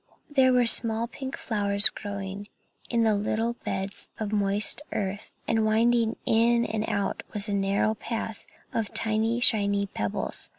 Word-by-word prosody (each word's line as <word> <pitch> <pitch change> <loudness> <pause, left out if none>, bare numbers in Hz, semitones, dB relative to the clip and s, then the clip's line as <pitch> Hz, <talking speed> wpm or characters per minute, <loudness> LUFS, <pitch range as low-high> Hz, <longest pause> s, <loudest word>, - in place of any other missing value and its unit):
There 265 -3 +3
were 250 -1 +3
small 230 0 +5
pink 265 +2 -8
flowers 205 -2 +5
growing 200 -1 -7 0.4
in 235 -1 +1
little 220 +2 -1
beds 195 +1 -4
of 215 -2 -4
moist 205 +4 +2
earth, 200 0 -4 0.2
and 225 -1 +1
winding 230 +1 +1
in 235 +1 +2
and 220 0 -3
out 200 -2 -2
was 210 0 +2
a 205 - -3
narrow 200 +2 0
path 225 0 -6 0.3
of 220 -2 -4
tiny 220 +1 0
shiny 200 -4 +3
pebbles. 105 - -3
215 Hz, 140 wpm, -26 LUFS, 200-230 Hz, 0.4 s, small